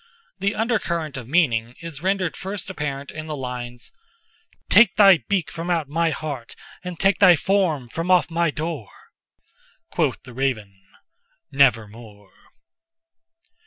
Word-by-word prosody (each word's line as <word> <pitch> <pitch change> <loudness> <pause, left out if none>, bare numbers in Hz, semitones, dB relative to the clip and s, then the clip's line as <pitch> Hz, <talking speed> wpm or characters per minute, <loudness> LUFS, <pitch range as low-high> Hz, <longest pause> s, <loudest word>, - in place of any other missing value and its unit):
The 200 +2 0
undercurrent 170 - -1
of 125 -4 -7
meaning 125 -7 +1
is 165 -4 -7
rendered 190 -2 0
first 195 0 -5
apparent 140 -4 -5
in 155 0 -7
the 155 - -4
lines—"'Take 180 - -1
thy 195 -4 +7
beak 195 -5 0
from 170 +1 -5
out 165 -4 0
my 165 +2 +1
heart, 140 -5 -5 0.3
and 180 -2 -7
take 195 +1 +3
thy 185 -4 +8
form 165 -7 0
from 165 +8 -4
off 180 -2 +4
my 170 0 +1
door!'Quoth 150 -8 -6
the 125 - -12
Raven 110 -7 -3 0.7
'Nevermore! 115 -6 0
160 Hz, 125 wpm, -22 LUFS, 125-185 Hz, 0.7 s, thy